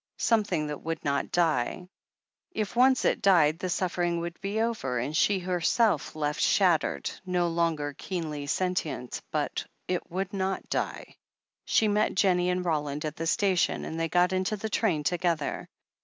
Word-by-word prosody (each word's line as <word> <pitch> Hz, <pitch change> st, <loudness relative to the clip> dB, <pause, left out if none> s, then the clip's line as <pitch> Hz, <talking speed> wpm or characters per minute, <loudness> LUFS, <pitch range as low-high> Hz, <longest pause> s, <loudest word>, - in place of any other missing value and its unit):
Something 210 Hz, -9 st, +1 dB
that 150 Hz, -1 st, -5 dB
would 165 Hz, 0 st, -4 dB
not 140 Hz, 0 st, 0 dB
die. 165 Hz, 0 st, +1 dB, 0.7 s
If 215 Hz, -, -3 dB
once 255 Hz, +2 st, +4 dB
it -, -, +2 dB
died 165 Hz, -6 st, +4 dB
the 185 Hz, -, -3 dB
suffering 175 Hz, -1 st, 0 dB
would 170 Hz, 0 st, -6 dB
be 200 Hz, +2 st, -2 dB
over, 220 Hz, -, -1 dB
and 130 Hz, +6 st, -2 dB
she 200 Hz, +5 st, +3 dB
herself 180 Hz, -, +1 dB
left 150 Hz, -1 st, -1 dB
shattered, 180 Hz, -5 st, +2 dB
no 180 Hz, -2 st, 0 dB
longer 165 Hz, -3 st, 0 dB
keenly 150 Hz, -3 st, -5 dB
sentient. 165 Hz, -7 st, -2 dB
But -, -, -2 dB, 0.2 s
it 180 Hz, -1 st, -2 dB
would 190 Hz, +3 st, -3 dB
not 190 Hz, -1 st, -2 dB
die. -, -, -3 dB, 0.5 s
She 220 Hz, -, +3 dB
met 210 Hz, +1 st, +1 dB
Jennie 180 Hz, -2 st, +3 dB
and 180 Hz, 0 st, -1 dB
Roland 150 Hz, -2 st, -1 dB
at 155 Hz, 0 st, -4 dB
the 165 Hz, -, -3 dB
station, 190 Hz, -1 st, +1 dB
and 160 Hz, -, -5 dB
they 165 Hz, 0 st, 0 dB
got 180 Hz, +2 st, +3 dB
into 185 Hz, +3 st, 0 dB
the 220 Hz, +2 st, -4 dB
train 175 Hz, -11 st, +1 dB
together. 170 Hz, -2 st, -1 dB
175 Hz, 160 wpm, -28 LUFS, 155-190 Hz, 0.7 s, once